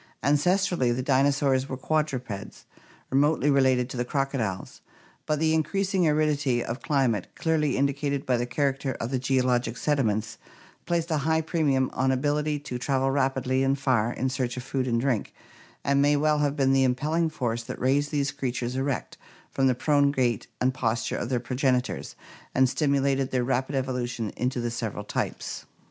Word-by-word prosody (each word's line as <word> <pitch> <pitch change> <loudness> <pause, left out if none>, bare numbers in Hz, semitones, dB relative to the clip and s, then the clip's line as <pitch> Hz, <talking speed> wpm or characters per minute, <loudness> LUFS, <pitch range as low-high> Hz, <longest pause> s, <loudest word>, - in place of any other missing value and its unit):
Ancestrally, 165 -1 +2
the 130 - -2
dino 135 +1 +3
saurs 135 -1 +1
were 130 - -4
quadrupeds 130 -8 -3 0.5
remotely 145 +2 +3
related 130 -3 +3
to - - -5
the 120 - 0
crocodiles; 125 -8 -3 0.5
but 155 - +1
the 160 +1 +2
increasing 185 +3 +1
aridity 150 -5 +1
of 115 +3 -5
climate, 130 -9 +1
clearly 155 -4 +1
indicated 140 0 0
by 130 - +2
the 120 0 -1
character 135 +1 -1
of 115 +2 -5
the 130 - 0
geologic 125 -2 +1
sediments, 110 -8 0 0.5
placed 170 -1 0
a 155 - +2
high 160 +3 +1
premium 145 -5 +1
on 130 0 +1
ability 150 +3 0
to 135 -4 -6
travel 135 0 +1
rapidly 135 -1 +1
and 135 +1 +2
far 125 -5 +1
in 130 - -2
search 130 -1 -2
of 125 - -4
food 135 -1 -2
and 115 -1 +1
drink, 130 -5 -1 0.5
and 140 0 +2
may 145 +1 +4
well 150 +1 +2
have 145 -1 +1
been 135 -2 +2
the 135 0 +4
impelling 150 +6 +1
force 120 -6 -2
that 115 - -7
raised 140 +3 +2
these 145 -2 0
creatures 125 -1 -3
erect 135 0 -3 0.3
from 135 -1 +2
the 130 - +2
prone 145 +1 +3
gait 125 -6 0
and 130 +1 +2
posture 115 -2 -1
of 120 - -3
their 125 -2 +1
progenitors 125 +1 -1 0.4
and 130 0 +5
stimulated 140 -1 +1
their 125 -1 0
rapid 130 +2 -1
evolution 125 -4 -2
into 125 0 -2
the 120 0 -2
several 115 -3 -4
types. - - -4
135 Hz, 170 wpm, -26 LUFS, 125-145 Hz, 0.5 s, and